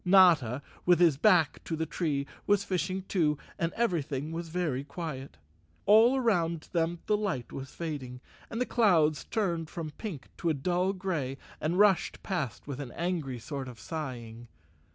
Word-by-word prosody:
Notta, 170 - +5 0.2
with 175 -2 +5
his 170 -5 +6
back 170 -4 +4
to 165 - -3
the 160 +1 -1
tree, 150 -3 -1 0.2
was 205 -1 +4
fishing 185 +1 -1
too, 160 -6 +1 0.2
and 165 0 0
everything 155 - -1
was 165 0 -4
very 155 -6 -1
quiet. 140 - -6 0.5
All 225 +6 +6
around 170 -10 +1
them 170 -1 0
the 210 - +3
light 190 - -2
was 135 0 -6
fading, 140 -7 -5 0.3
and 230 - -4
the 250 - +2
clouds 165 - +3
turned 170 -7 -1
from 160 -3 -5
pink 170 - -7
to 170 - 0
a 155 - +2
dull 180 +6 +1
gray 165 -9 -2 0.2
and 160 +4 0
rushed 200 -2 +3
past 150 - -3
with 140 -2 -5
an 135 -4 -6
angry 165 -7 -2
sort 135 +4 -5
of 120 -3 -10
sighing. 120 -3 -6
165 Hz, 165 wpm, -30 LUFS, 140-185 Hz, 0.5 s, his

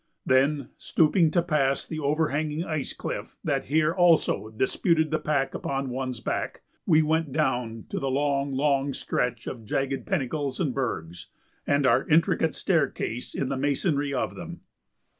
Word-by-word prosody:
Then, 135 +1 +2
stooping 165 +1 +3
to 170 +2 +2
pass 140 -5 +1
the 155 - -5
overhanging 150 +1 0
ice 155 -5 -3
cliff - - -6
that - - 0
here 155 +3 +2
also 170 - +3
disputed 155 +8 +1
the 155 - +1
pack 140 -3 0
upon 135 -1 -3
one's 130 -1 -3
back, 115 - -3 0.2
we 160 -2 +5
went 160 -1 0
down 125 -6 -1
to - - -2
the 135 - -1
long, 140 0 0
long 140 0 +1
stretch 125 -2 -2
of 115 -3 -6
jagged 135 +5 -2
pinnacles 145 -4 -1
and 150 -8 0
bergs, 90 -11 -4 0.4
and 140 -1 +2
our 115 - +3
intricate 160 0 +3
staircase 140 - -1
in 135 - -1
the 135 - -1
masonry 145 +1 0
of 135 - -1
them. - - -8
140 Hz, 155 wpm, -26 LUFS, 130-155 Hz, 0.4 s, we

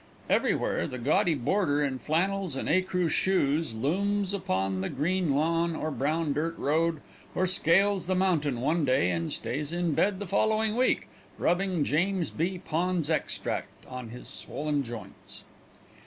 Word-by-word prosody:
Everywhere, - - +1
the 125 - -5
gaudy 150 +6 +2
boarder 145 +2 +1
in 135 -2 -1
flannels 185 +2 0
and - - -3
ecru 180 +1 +2
shoes 155 -6 +1
looms 195 - 0
upon 95 - -1
the 95 - -2
green 170 0 0
lawn 165 +2 +1
or 155 0 -2
the - - -6
brown 155 +2 0
dirt 165 +3 -2
road, 160 +1 +1 0.3
or 185 - +2
scales 185 +2 +3
the 185 - +1
mountain 155 -9 +1
one 155 +5 +1
day 130 -9 +3
and 85 -1 -2
stays 145 +4 -3
in 175 -2 0
bed 195 +6 +2
the 205 - -5
following 215 +3 +1
week, 255 +1 +2 0.3
rubbing 180 -2 +1
James 170 +2 0
B. 180 +4 -1
Pond's 175 -2 -1
Extract 155 - -2
on 125 -2 -7
his 125 +2 -9
swollen 150 -1 -1
joints. 120 -4 -8
165 Hz, 155 wpm, -28 LUFS, 145-185 Hz, 0.3 s, scales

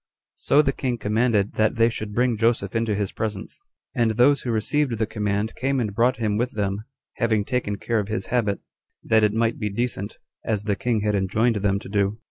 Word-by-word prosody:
So 150 - +4
the 135 - +2
king 125 -3 -2
commanded 105 -1 +1
that 110 +2 +2
they 115 -1 +4
should 110 -1 -5
bring 120 +2 +1
Joseph 110 -3 0
into 115 -2 +1
his 100 -1 -2
presence; 105 -2 -5 0.3
and 120 -4 +2
those 125 +6 +4
who 125 - -5
received 120 +3 0
the 110 - +1
command 105 0 -2
came 135 +1 -1
and 105 -4 -2
brought 120 +4 +2
him 105 -3 0
with 120 +2 -1
them, 100 0 -2 0.3
having 110 -3 +1
taken 120 -5 -1
care 115 +2 -1
of 100 - -3
his 110 +2 -3
habit, 105 -5 +1 0.4
that 110 -1 +3
it 105 - +4
might 115 +1 0
be 105 -2 -1
decent, 105 -1 -3 0.3
as 105 -3 -1
the 105 -2 0
king 115 -1 0
had 105 0 0
enjoined 105 +4 +1
them 100 -1 +1
to - - -8
do. 100 +2 0
110 Hz, 210 wpm, -24 LUFS, 105-120 Hz, 0.4 s, So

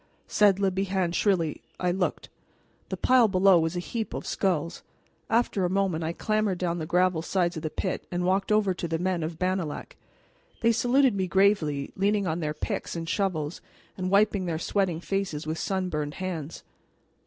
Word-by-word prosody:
said 205 -2 +3
Le 195 -1 +2
Bihan 190 -2 0
shrilly. 175 -6 +1 0.2
I 180 -1 +1
looked. 180 0 -2 0.6
The - - -3
pile 250 -3 +5
below 190 -2 +5
was 160 +1 -1
a - - -1
heap 220 +5 -4
of - - -5
skulls. 175 -3 -1 0.5
After 225 -4 +1
a 180 - +1
moment 185 -4 0
I 160 - -1
clambered 215 +1 0
down 175 -1 -1
the 155 - -4
gravel 180 -1 +2
sides 175 0 0
of 160 - -4
the 155 - -2
pit 185 +4 -3
and 175 0 -1
walked 190 +2 +1
over 210 -3 +3
to 175 - -4
the 165 0 -1
men 180 0 -1
of 160 +1 -4
Bannalec. 185 -4 -2 0.7
They 230 - +4
saluted 245 +3 +3
me 190 -2 -1
gravely, 175 -7 +2
leaning 200 +1 +1
on 165 0 -1
their 150 -2 -2
picks - - -3
and 165 -1 -4
shovels, 170 -5 -1 0.3
and 185 -1 -3
wiping 200 -1 +3
their 165 -2 -1
sweating 175 -1 -1
faces 190 -6 -2
with 160 +1 -3
sunburned 170 -6 -2
hands. 170 -5 -5
185 Hz, 180 wpm, -27 LUFS, 165-195 Hz, 0.7 s, pile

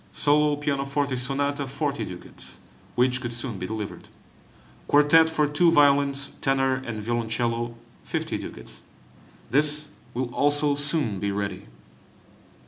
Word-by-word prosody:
Solo 150 0 +3
pianoforte 140 -1 -1
Sonata, 140 +2 -1
40 145 +1 -2
ducats 90 -1 -9 0.4
(which 125 +1 +2
could 120 -2 -4
soon 120 -3 -2
be 90 - -4
delivered); 110 -1 -6 0.8
Quartet 150 +3 +6
for 155 -2 +2
two 155 +4 +3
violins, 140 -2 +3
tenor, 135 -1 +2
and 110 -4 -5
violoncello, 115 +1 -1 0.3
50 - - -3
ducats - - -9 0.7
(this 150 +2 +2 0.3
will 125 -1 -2
also 145 0 +2
soon 145 - 0
be 100 - -1
ready). 100 -8 -3
140 Hz, 120 wpm, -25 LUFS, 120-145 Hz, 0.8 s, Quartet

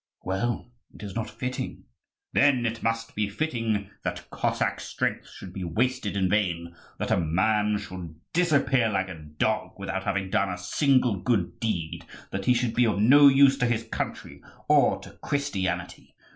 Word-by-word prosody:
"Well, 120 +5 -2 0.2
it - - -11
is 100 -2 -6
not 115 +1 -3
fitting." 125 0 -5 0.5
"Then 135 -4 +4
it 115 0 -2
must 115 0 -1
be 105 -1 -1
fitting 110 -5 -2
that - - -5
Cossack - - 0
strength - - -3
should 90 - -10
be 95 - -5
wasted 110 +4 -1
in 95 -1 +2
vain, 85 -4 0 0.2
that - - -3
a - - +3
man 105 +6 +2
should 90 -5 -8 0.2
disappear 140 -8 +3
like 95 -2 -1
a 85 -3 -8 0.2
dog 110 +4 0
without 95 -1 -4
having 100 -1 -1
done 100 - +2
a 90 - -3
single 130 - +2
good 90 -6 0
deed, 90 -9 -2 0.3
that 95 0 -3
he 125 - +4
should 120 -2 0
be 120 -1 +3
of 105 - 0
no 140 +7 +8
use 135 0 +6
to 125 - +2
his 115 -1 0
country - - -4 0.3
or - - +4
to - - -11
Christianity! 95 -11 -3
105 Hz, 170 wpm, -26 LUFS, 95-125 Hz, 0.5 s, no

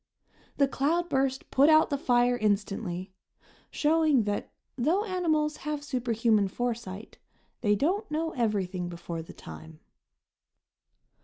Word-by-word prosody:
The 280 - +4
cloudburst 275 -2 0
put 280 +3 +5
out 310 0 +5
the - - +2
fire 245 -1 +3
instantly, 200 -4 -2 0.6
showing 305 -4 +3
that, 205 0 -3 0.2
though 330 - +1
animals 315 -6 0
have 300 -1 -4
superhuman 230 -6 +1
foresight, 225 -2 -5 0.4
they 210 -2 +3
don't 375 - 0
know 320 +2 -1
everything 195 - -1
before 170 -1 -6
the 160 - -11
time. 80 0 -11
245 Hz, 110 wpm, -28 LUFS, 205-300 Hz, 0.6 s, put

